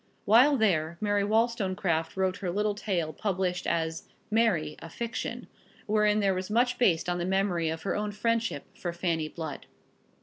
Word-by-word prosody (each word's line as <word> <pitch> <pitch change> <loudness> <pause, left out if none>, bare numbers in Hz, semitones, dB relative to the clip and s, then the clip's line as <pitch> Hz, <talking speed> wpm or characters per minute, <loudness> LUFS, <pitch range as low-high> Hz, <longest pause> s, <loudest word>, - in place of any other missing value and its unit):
While 255 +7 +6
there, 170 -7 +1
Mary 205 -1 +1
Wollstonecraft 200 -7 0
wrote 190 0 +1
her 185 - -3
little 210 +3 0
tale 180 -6 -2
published 185 -1 -1
as 160 -1 -2 0.2
"Mary, 190 -10 +2
a 165 - -9
Fiction," 230 +6 -4 0.4
wherein 210 -1 +2
there 195 -1 +3
was 185 +1 -4
much 245 +3 +2
based 175 -10 +3
on 175 0 -1
the - - -1
memory 185 -3 +1
of 160 0 -4
her 195 - -1
own 210 0 -2
friendship 225 -6 -1
for 175 -2 -4
Fanny 170 -3 -1
Blood. 160 -2 -7
190 Hz, 165 wpm, -28 LUFS, 170-215 Hz, 0.4 s, While